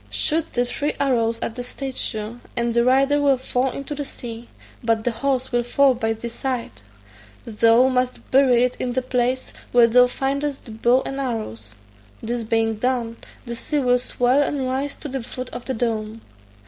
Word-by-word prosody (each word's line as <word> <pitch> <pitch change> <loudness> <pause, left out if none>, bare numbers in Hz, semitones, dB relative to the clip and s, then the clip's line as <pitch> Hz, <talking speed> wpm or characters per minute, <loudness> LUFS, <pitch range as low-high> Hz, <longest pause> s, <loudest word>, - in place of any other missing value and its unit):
Shoot 320 +1 0
the 245 0 +1
three 285 +4 -2
arrows 230 -4 +1
at - - -3
the 245 - -5
statue, 245 -3 -4 0.2
and 235 0 0
the 235 0 +3
rider 275 +3 +3
will 280 -2 +4
fall 255 0 0
into 275 +3 -5
the 290 0 -3
sea, 235 -3 -8 0.3
but 225 -1 +1
the 245 - +1
horse 260 +2 -1
will 240 -1 +2
fall 270 +3 +3
by 225 -2 -1
thy 225 +2 -6
side; 250 +1 -3 0.7
thou 230 +3 +4
must 255 -1 -1
bury 255 -2 +5
it 250 0 0
in 250 -1 -2
the 260 0 0
place 255 0 -1 0.2
where 240 -1 +7
thou 250 +2 +6
findest 275 +2 -2
the 230 - -9
bow 240 +4 +2
and 270 - -4
arrows: 165 - -4 0.4
this 240 +1 -3
being 225 0 +1
done, 235 -1 -1 0.3
the 235 - -5
sea 295 +5 -2
will 250 -3 +3
swell 250 +2 +2
and 280 -2 -1
rise 270 +2 -2
to - - -8
the 270 -1 -4
foot 255 +2 -7
of - - -7
the 260 - -2
dome. 225 -1 -2
250 Hz, 185 wpm, -22 LUFS, 230-265 Hz, 0.7 s, where